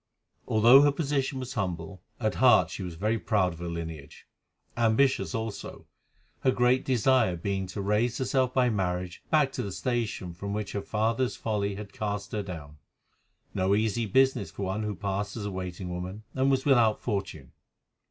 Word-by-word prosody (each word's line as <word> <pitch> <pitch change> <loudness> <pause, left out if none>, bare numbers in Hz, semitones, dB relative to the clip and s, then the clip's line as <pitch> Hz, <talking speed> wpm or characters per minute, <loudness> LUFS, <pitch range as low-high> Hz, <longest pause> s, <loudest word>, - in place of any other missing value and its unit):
Although 120 +5 +7
her 145 0 +5
position 140 -2 -1
was 130 0 -5
humble, 90 -4 -4 0.2
at 110 -3 0
heart 125 -4 +5
she - - -6
was 90 -3 -5
very 110 +6 0
proud 100 -6 +1
of 85 - -13
her 85 - -5
lineage, 80 -4 -7 0.5
ambitious 115 -4 +2
also, 110 -2 -5 0.5
her - - +2
great 125 +1 +3
desire 125 -5 +3
being 95 +2 -2
to 90 +3 -5
raise 110 +4 +1
herself 130 -1 +1
by 130 -1 +3
marriage 90 -3 -2
back 150 -3 +3
to - - -3
the 100 - -4
station 115 -6 -2
from 100 +3 -5
which 105 -1 -3
her 100 - -3
father's 115 +5 0
folly 100 -2 -2
had 100 -1 -8
cast 105 -1 -3
her 105 - -1
down—no 90 +3 -5
easy 110 +1 0
business 130 -1 +2
for 100 - -6
one 95 +3 -2
who 105 -1 -3
passed 100 +2 -3
as 105 - -4
a 100 - -3
waiting 90 -1 -5
woman 90 +4 -6
and 135 +1 +2
was 135 -1 +1
without 120 -6 +4
fortune. 95 - -4
105 Hz, 170 wpm, -28 LUFS, 95-120 Hz, 0.5 s, Although